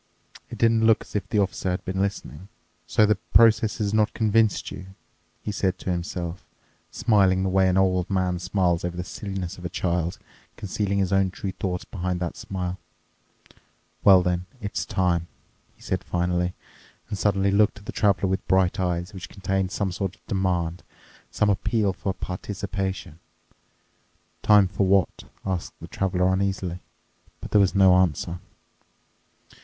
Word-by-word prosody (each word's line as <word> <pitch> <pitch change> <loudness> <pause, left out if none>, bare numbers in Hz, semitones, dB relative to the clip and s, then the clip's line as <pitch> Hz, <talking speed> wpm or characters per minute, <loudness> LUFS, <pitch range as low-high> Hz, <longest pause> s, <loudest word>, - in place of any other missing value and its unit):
It - - -8
didn't 115 -1 +3
look 115 - +4
as - - -13
if 105 - -2
the - - 0
Officer 95 -2 0
had 90 - -3
been 95 +1 -2
listening. 95 -3 -4 0.4
"So 110 - +4
the 105 - +4 0.2
process 115 -1 +5
has 105 -2 -1
not 110 0 +2
convinced 110 -1 +2
you," 95 - -8 0.6
he 105 - -3
said 95 -2 0
to 95 - -3
himself, 85 0 -4 0.5
smiling 95 -4 +3
the 95 - 0
way 95 0 +3
an 90 - +1
old 90 -1 +2
man 90 -2 0
smiles 90 -2 0
over 90 0 -3
the 90 - -2
silliness 95 -1 -6
of - - -11
a - - -2
child, 85 -1 -1 0.4
concealing 100 0 -2
his 95 -1 +1
own 95 -1 +3
true 95 +1 -5
thoughts 90 -1 -4
behind 90 -1 -3
that 85 -1 -3
smile. 90 -1 -4 1.2
"Well 95 -2 +7
then, 90 0 -1
it's 100 -3 -4
time," 85 -2 0 0.5
he - - -20
said 95 0 -2
finally 90 0 -1 0.5
and - - -2
suddenly 100 0 +1
looked 105 +1 +3
at 100 - -14
the - - -5
Traveler 100 -2 +2
with 95 0 -2
bright 95 -1 +2
eyes 90 0 -1
which 90 -2 -8
contained 95 -1 -1
some 100 -3 -1
sort 95 0 -3
of - - -35
demand, 90 -3 -1 0.5
some 105 -1 +2
appeal 100 0 0
for 95 +1 -3
participation. 95 -3 -5 1.2
"Time 105 -2 +6
for 95 +1 0
what?" 95 -2 +2 0.2
asked 95 -3 -3
the - - -9
Traveler 90 -1 0
uneasily. 95 -2 -1 0.6
But - - -9
there 105 - +5
was 95 0 +2
no 95 -2 +6
answer. 90 -1 0
95 Hz, 160 wpm, -25 LUFS, 90-100 Hz, 1.2 s, Well